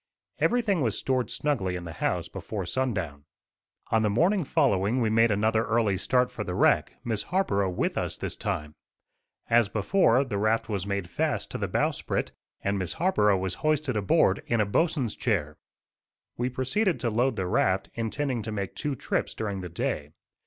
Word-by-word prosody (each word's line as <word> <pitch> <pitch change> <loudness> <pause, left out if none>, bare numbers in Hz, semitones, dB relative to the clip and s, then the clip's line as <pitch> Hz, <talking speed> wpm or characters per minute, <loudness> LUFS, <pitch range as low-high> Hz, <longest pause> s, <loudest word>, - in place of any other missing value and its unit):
Everything 220 -8 +2
was 115 -6 0
stored 130 -4 0
snugly 115 -12 -1
in 90 - -5
the 85 -1 -7
house - - 0
before 100 -4 -5
sundown. 90 - -2 0.7
On 110 - +4
the 110 - +2
morning 175 - +2
following 125 - +2
we 110 -3 +1
made 115 +1 +4
another 110 +2 +2
early 115 -3 +2
start 125 +6 +1
for - - -4
the - - -4
wreck, - - +3
Miss 110 -3 -1
Harborough 100 - 0
with 90 - -1
us - - -3
this - - -4
time. 75 0 -3 0.7
As 115 -3 +4
before, 115 - +3
the 110 -7 -3
raft 110 +2 +1
was 100 -3 -3
made 100 -3 -2
fast - - -1
to - - -4
the - - -1
bow - - +1
sprit, - - -3 0.3
and 100 0 0
Miss 90 - -3
Harborough 160 - +3
was 95 -1 -2
hoisted 155 -4 +1
aboard 100 -1 +3
in 115 - +1
a 105 - +3
bo'sn's 135 +1 0
chair. 85 -11 -1 0.8
We 125 +1 -1
proceeded 130 - 0
to 120 -3 0
load 120 +3 +1
the 95 - -2
raft, 95 +1 +1
intending 120 +2 -2
to 110 +1 -5
make 100 -3 -3
two 145 -2 -3
trips - - -2
during 100 -3 -3
the 90 - -6
day. 75 -3 -3
110 Hz, 180 wpm, -27 LUFS, 100-130 Hz, 0.8 s, On